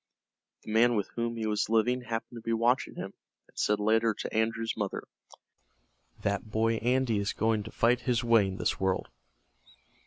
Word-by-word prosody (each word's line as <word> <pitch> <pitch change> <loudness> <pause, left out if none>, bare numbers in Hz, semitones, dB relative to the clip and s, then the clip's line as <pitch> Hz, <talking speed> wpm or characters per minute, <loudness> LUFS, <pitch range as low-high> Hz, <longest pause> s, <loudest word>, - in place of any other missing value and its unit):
The - - -7
man 120 +2 +4
with 100 -2 -1
whom 115 0 -3
he 110 - -2
was 105 -1 0
living 120 +3 +2
happened 115 0 -5
to - - -13
be 115 +1 -2
watching 120 +3 +1
him, - - -6 0.3
and - - -27
said 105 0 +1
later 110 +1 +2
to - - -6
Andrew's 115 +1 0
mother: 100 -3 -3 1.2
"That 100 +2 -1
boy 115 +1 +1
Andy 125 -2 +1
is 100 0 -1
going 110 0 +1
to 110 - -9
fight 120 +2 +2
his 125 -1 0
way 115 -4 +4
in 95 0 -5
this 90 - -1
world." 95 -1 0
115 Hz, 180 wpm, -29 LUFS, 105-115 Hz, 1.2 s, man